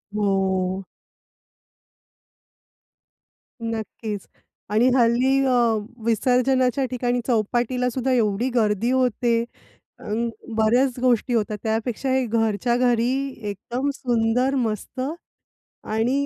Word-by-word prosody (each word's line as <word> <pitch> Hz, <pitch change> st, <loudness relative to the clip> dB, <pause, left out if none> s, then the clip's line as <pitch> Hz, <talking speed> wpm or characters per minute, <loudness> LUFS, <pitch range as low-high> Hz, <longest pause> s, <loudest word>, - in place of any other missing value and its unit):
हो. 190 Hz, -2 st, 0 dB, 2.8 s
नक्कीच. 220 Hz, -2 st, -5 dB, 0.4 s
आणि 225 Hz, +4 st, +4 dB
हल्ली 250 Hz, +2 st, +3 dB
अ, 260 Hz, -, +2 dB, 0.5 s
विसर्जनाच्या 250 Hz, +3 st, +2 dB
ठिकाणी 245 Hz, -1 st, 0 dB
चौपाटीलासुद्धा 250 Hz, +2 st, 0 dB
एवढी 225 Hz, +1 st, +1 dB
गर्दी 220 Hz, 0 st, +2 dB
होते. 240 Hz, -2 st, +1 dB, 0.6 s
अन, 230 Hz, +3 st, -2 dB, 0.3 s
बऱ्याच 245 Hz, +4 st, +2 dB
गोष्टी 250 Hz, 0 st, +2 dB
होतात 215 Hz, -2 st, 0 dB
त्यापेक्षा 225 Hz, +4 st, -1 dB
हे 260 Hz, -1 st, +2 dB
घरच्या 225 Hz, 0 st, +1 dB
घरी, 245 Hz, -1 st, +2 dB, 0.4 s
एकदम 240 Hz, +7 st, -3 dB
सुंदर, 245 Hz, +2 st, +1 dB
मस्त. 230 Hz, 0 st, -2 dB, 0.8 s
आणि 240 Hz, +6 st, 0 dB
235 Hz, 85 wpm, -23 LUFS, 220-255 Hz, 2.8 s, आणि